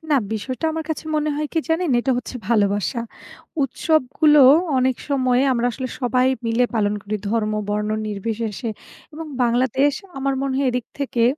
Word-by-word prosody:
না - - +5 0.2
বিষয়টা 255 +8 -4
আমার 320 0 -3
কাছে 315 - -3
মনে 300 0 0
হয় 300 0 -1
কি 330 - +1
জানেন? 325 0 +1
এটা 265 - -1
হচ্ছে 250 - -7
ভালোবাসা। 205 +1 +1 0.6
উৎসবগুলো 300 +2 +3 0.4
অনেক 255 -1 +2
সময় 255 -3 +2
আমরা 240 0 +1
আসলে 255 +2 -4
সবাই 250 0 +2 0.2
মিলে 230 +2 +2
পালন 210 -1 +1
করি 210 +1 -3
ধর্ম, 215 -2 0 0.2
বর্ণ 210 +1 -1 0.2
নির্বিশেষে। 220 +2 -3 0.4
এবং 320 +1 -7 0.2
বাংলাদেশ 260 +4 +2 0.3
আমার 275 0 0
মনে 270 -1 -1
হয় 275 - +1
এদিক 245 -1 -2
থেকে 245 -4 0
250 Hz, 160 wpm, -21 LUFS, 225-280 Hz, 0.6 s, না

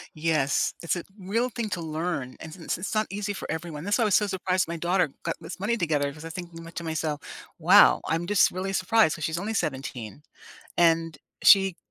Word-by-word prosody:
Yes. 155 -3 +1
It's 170 - 0
a 175 - -5
real 215 +6 -1
thing 235 -2 -4
to 185 -2 -2
learn, 155 -4 -3
and 160 - -9
since 175 -1 -4
it's 185 +5 -4
not 215 0 +1
easy 205 +1 -3
for 200 - -6
everyone. 160 -2 -5
That's 205 +2 +1
why - - +2
I - - +4
was 205 - +2
so 210 - +4
surprised 185 -2 0
my 170 - -3
daughter 175 -1 +1
got 165 - -2
this - - -8
money 210 +5 0
together 150 -6 0
'cause 155 +2 -12
I - - -6
was 165 - -7
thinking 170 -2 -8
my 165 - -10
to 170 - -6
myself, 160 -2 -2 0.4
"Wow!" - - +6
I'm 165 +2 -1
just 205 0 +4
really 185 +2 -3
surprised 185 -1 +3
'cause 155 - -5
she's 160 +2 -1
only 210 +5 -3
17, 135 - -4 0.5
and, 165 -2 +2 0.3
she 195 -3 +7
170 Hz, 220 wpm, -26 LUFS, 160-195 Hz, 0.5 s, she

